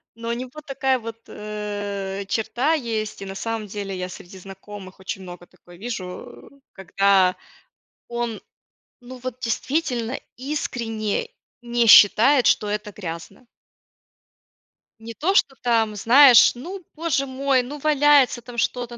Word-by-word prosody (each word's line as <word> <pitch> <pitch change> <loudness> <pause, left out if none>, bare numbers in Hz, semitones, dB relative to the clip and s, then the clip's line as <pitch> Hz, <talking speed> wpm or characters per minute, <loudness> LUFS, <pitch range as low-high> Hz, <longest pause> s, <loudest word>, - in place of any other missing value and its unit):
Но 230 0 -6
у - - 0
него 255 +5 -7
такая 265 -2 0
вот, 225 0 -8
э, 205 -2 -5
черта 245 +8 0
есть, 225 -8 -3
и - - -5
на 195 0 -7
самом 225 -1 -4
деле 200 -1 -5
я 180 0 -4
среди 180 +1 -11
знакомых 195 0 -11
очень 190 +1 -6
много 175 -1 -11
такое 175 -1 -19
вижу, 220 +1 -8 0.2
когда 195 -1 +2 0.7
он 235 -2 -4 0.6
ну 255 +1 -10
вот 255 0 -7
действительно 250 0 -2 0.2
искренне 245 - -3 0.3
не 240 -1 0
считает, 235 +6 +7
что 210 - +2
это 210 0 -4
грязно. 185 +5 -8 1.5
Не 230 +1 -9
то, 365 +10 0
что 275 -8 +2
там, 225 -3 +1
знаешь, 250 +4 +7
ну, 360 +9 -8
Боже 305 -4 -1
мой, 265 -1 0
ну, 290 +4 -8
валяется 290 -4 +4
там 240 0 -11
что-то, 240 0 -2
230 Hz, 135 wpm, -22 LUFS, 200-255 Hz, 1.5 s, считает